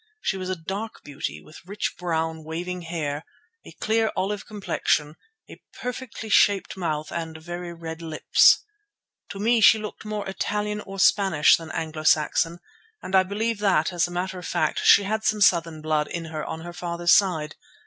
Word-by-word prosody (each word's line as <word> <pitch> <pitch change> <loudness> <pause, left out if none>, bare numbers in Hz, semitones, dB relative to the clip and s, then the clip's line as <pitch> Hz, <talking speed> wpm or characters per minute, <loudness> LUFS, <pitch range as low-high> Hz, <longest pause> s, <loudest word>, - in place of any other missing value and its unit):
She 195 - -1
was 185 -1 -5
a 185 - -1
dark 195 +6 -6
beauty, 145 -1 -5
with 155 - -14
rich 200 +4 -3
brown, 160 -2 -2
waving 175 +3 -5
hair, 160 -3 -4 0.4
a - - -12
clear 220 0 0
olive 200 +2 -2
complexion, 160 -7 -1 0.3
a - - -13 0.2
perfectly 250 -2 -6
shaped 205 -2 +3
mouth 155 -4 -3
and 165 -1 -4
very 175 +2 -7
red 165 -1 -7
lips. 160 -2 +4 0.7
To - - -7
me 225 +3 +2
she 220 - +8
looked 210 -1 -7
more 210 -2 -4
Italian 210 +2 -2
or 195 0 -7
Spanish 190 -6 +5
than 165 -1 -8
Anglo 160 -1 -4
Saxon, 160 +2 +2 0.4
and 190 - -2
I 190 - +7
believe 210 +4 -2
that, 185 -5 +2
as 175 -1 +1
a - - -10
matter 185 +1 -3
of 180 - -7
fact, 155 -1 0
she 200 - +7
had 215 +2 -2
some 215 0 +1
southern 165 -5 +3
blood 155 -1 +1
in 170 -1 -5
her 155 -1 -3
on 160 - -5
her 175 +1 -8
father's 175 -1 +1
side. 160 -6 +2
175 Hz, 180 wpm, -25 LUFS, 160-205 Hz, 0.7 s, she